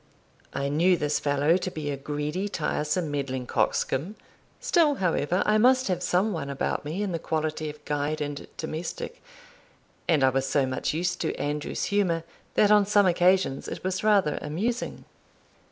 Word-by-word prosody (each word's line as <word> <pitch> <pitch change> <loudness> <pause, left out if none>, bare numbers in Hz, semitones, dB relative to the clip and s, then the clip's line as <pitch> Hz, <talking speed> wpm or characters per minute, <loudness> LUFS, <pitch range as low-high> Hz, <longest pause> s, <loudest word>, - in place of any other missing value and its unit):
I 140 0 -2
knew 170 +6 +3
this 150 -1 0
fellow 145 +4 +2
to 185 - -3
be 155 -4 -4
a - - -2
greedy, 150 +7 -3
tiresome, 155 -2 -1
meddling 135 -3 -2
coxcomb; 155 - 0 0.4
still, 310 -4 +3
however, 180 - +1
I 215 0 +3
must 255 +1 +4
have 180 -1 0
some 190 +4 +1
one 150 -5 -4
about 140 - -2
me 160 +8 -3
in 200 - -2
the 165 - -2
quality 155 -1 -2
of 150 0 -11
guide 150 +1 -1
and 145 -1 -4
domestic, 160 - -5 0.9
and 155 -5 +3
I 130 - +6
was 135 +1 0
so 140 -1 +2
much 130 0 -2
used 180 +2 -1
to - - -1
Andrew's 145 +1 -3
humour, 175 -5 +2 0.3
that 210 -1 +5
on 210 -2 +5
some 205 -1 +4
occasions 180 -5 +2
it - - -6
was 185 +1 -2
rather 200 -7 +3
amusing. 220 +11 -3
160 Hz, 170 wpm, -26 LUFS, 145-190 Hz, 0.9 s, I